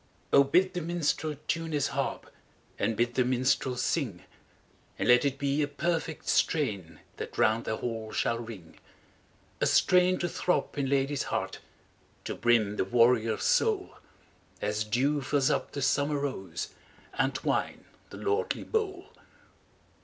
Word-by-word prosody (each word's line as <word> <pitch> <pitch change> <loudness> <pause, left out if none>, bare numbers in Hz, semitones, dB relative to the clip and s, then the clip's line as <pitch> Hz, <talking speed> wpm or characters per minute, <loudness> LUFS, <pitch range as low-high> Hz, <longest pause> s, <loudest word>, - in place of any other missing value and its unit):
BID 180 +7 +4
the 180 - -2
minstrel 160 -2 -1
tune 165 -1 -2
his 145 -2 +1
haxp, - - -2 0.6
And 115 - 0
bid 120 +1 +1
the 125 - +2
minstrel 130 0 +1
sing; 120 - -1 0.7
And - - -1
let 125 0 +6
it 140 -1 0
be 140 +1 0
a 145 - +1
perfect 160 +2 -2
strain 100 - 0 0.2
That - - -7
round 110 +2 +2
the 110 - -2
hall 115 -2 -4
shall 115 - 0
ring: 110 -8 -10 0.8
A - - +2
strain 180 0 +4
to 175 - -1
throb 180 +1 -1
in 140 -2 -1
lad/s 140 0 +1
heart, - - -2 0.7
To - - -3
brim 110 -3 +2
the - - +1
warrior's 115 +1 +3
soul. - - +1 0.6
As 105 +1 -1
dew 135 +7 +1
fills 135 0 +1
up - - -1
the 140 - -3
summer 145 +2 +1
rose 130 -12 -4 0.4
And 135 0 0
wine - - -1 0.2
the - - -9
lordly 415 +3 -1
bowl 395 -4 -2
135 Hz, 145 wpm, -29 LUFS, 115-155 Hz, 0.8 s, let